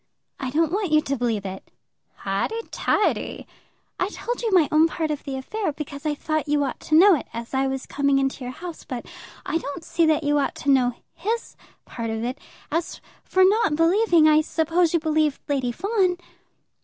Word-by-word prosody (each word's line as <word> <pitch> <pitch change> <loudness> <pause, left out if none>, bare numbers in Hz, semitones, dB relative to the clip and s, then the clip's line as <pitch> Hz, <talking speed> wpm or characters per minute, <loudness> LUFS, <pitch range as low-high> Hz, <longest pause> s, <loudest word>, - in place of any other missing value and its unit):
"I 260 - -3
don't 320 +3 +1
want 390 -3 -1
you 305 - +6
to 275 -2 -2
believe 230 -5 -1
it." 190 0 -7 0.5
"Highty, 195 - -2
tighty!" 415 - 0 0.5
"I 370 - 0
told 480 +3 -4
you 460 -2 -1
my 355 -6 +5
own 310 +1 +5
part 320 -1 -2
of 295 - -4
the 275 -2 -5
affair, 380 +8 -3
because 285 0 -6
I 295 - 0
thought 310 +1 -2
you 290 0 +2
ought 270 - -3
to 310 - 0
know 390 +4 +8
it 295 - -1
as 235 +2 -7
I 270 0 +1
was 265 0 -3
coming 280 -1 +1
into 270 -1 -1
your 250 - -4
house. 335 +4 -8
But 250 -3 -6 0.4
I 330 - 0
don't 320 +2 -6
see 330 0 +1
that 310 0 +2
you 290 0 +2
ought 280 - -1
to 280 - 0
know 250 -3 +3 0.2
his 440 +7 -3 0.3
part 230 -2 -5
of 225 0 -3
it. 250 +3 -3 0.3
As 330 +2 -2 0.2
for 375 - +3
not 395 -5 +3
believing, 335 0 +4
I 310 0 +5
suppose 330 +2 +1
you 340 - +2
believed 310 -2 +1
Lady 265 -4 0
Fawn?" 385 - 0
305 Hz, 200 wpm, -24 LUFS, 270-345 Hz, 0.5 s, know